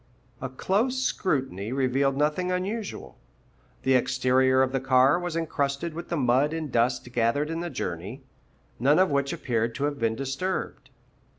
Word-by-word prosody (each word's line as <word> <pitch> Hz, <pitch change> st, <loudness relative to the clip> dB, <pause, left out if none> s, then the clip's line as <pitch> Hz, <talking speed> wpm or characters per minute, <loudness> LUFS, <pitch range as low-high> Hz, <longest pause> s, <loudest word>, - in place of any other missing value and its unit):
A 130 Hz, -, -3 dB
close 210 Hz, -, 0 dB
scrutiny 130 Hz, -, -1 dB
revealed 135 Hz, +1 st, +1 dB
nothing 155 Hz, +5 st, +1 dB
unusual. 200 Hz, +4 st, -4 dB, 0.6 s
The 130 Hz, -, +3 dB
exterior 130 Hz, +1 st, +3 dB
of 130 Hz, -, -1 dB
the 135 Hz, -, 0 dB
car 130 Hz, +4 st, +4 dB
was 175 Hz, -2 st, -4 dB
encrusted 155 Hz, -1 st, -1 dB
with 170 Hz, +2 st, -7 dB
the 170 Hz, -, -1 dB
mud 135 Hz, +3 st, +2 dB
and 160 Hz, -4 st, -4 dB
dust 120 Hz, +1 st, 0 dB
gathered 120 Hz, +6 st, +1 dB
in 165 Hz, -, -3 dB
the 175 Hz, 0 st, -3 dB
journey, 95 Hz, -, -5 dB, 0.6 s
none 140 Hz, +6 st, +4 dB
of 185 Hz, -3 st, +4 dB
which 140 Hz, -1 st, +1 dB
appeared 115 Hz, -2 st, -1 dB
to 140 Hz, -, -3 dB
have 145 Hz, -1 st, -1 dB
been 115 Hz, -1 st, +1 dB
disturbed. 135 Hz, +9 st, -3 dB
135 Hz, 160 wpm, -26 LUFS, 125-165 Hz, 0.6 s, car